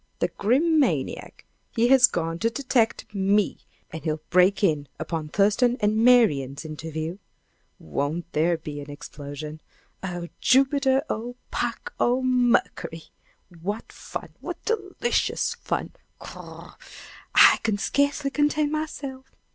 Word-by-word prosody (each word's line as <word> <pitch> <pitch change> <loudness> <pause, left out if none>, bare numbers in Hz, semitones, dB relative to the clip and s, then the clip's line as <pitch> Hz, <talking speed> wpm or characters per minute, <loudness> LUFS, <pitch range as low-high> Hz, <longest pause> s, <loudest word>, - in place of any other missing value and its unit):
The - - 0
Grim 300 +10 +2
maniac! 280 - -1 0.3
he 235 0 +3
has 260 -2 +8
gone 165 0 -3
to 230 - +2
detect 235 -4 0
me! 200 +1 +1 0.3
And 160 -2 -7
he'll 155 -1 -2
break 185 +3 +4
in 150 -6 +2
upon 155 0 -4
Thurston 210 +7 +2
and 210 +1 +2
Marian's 155 - +4
interview. 160 +3 -5 0.6
Won't 145 - -3
there 165 +2 +2
be 150 -2 -7
an 145 - -10
explosion! 145 +1 -8 0.4
Oh, 175 -2 -5
Jupiter! 270 +1 +3
Oh, 240 +3 -4 0.2
Puck! - - -3
Oh, 250 +2 +2
Mercury! 245 -9 +1 0.5
What 205 +5 -4
fun - - -7
what - - -6
delicious 435 +1 0
fun! - - -3 0.3
Wr - - -10
r - - -10
r - - -11
r! - - -18 0.6
I - - +8
can 215 -2 0
scarcely 285 +5 0
contain 295 0 +1
myself! 280 -4 -5
205 Hz, 130 wpm, -25 LUFS, 160-260 Hz, 0.6 s, has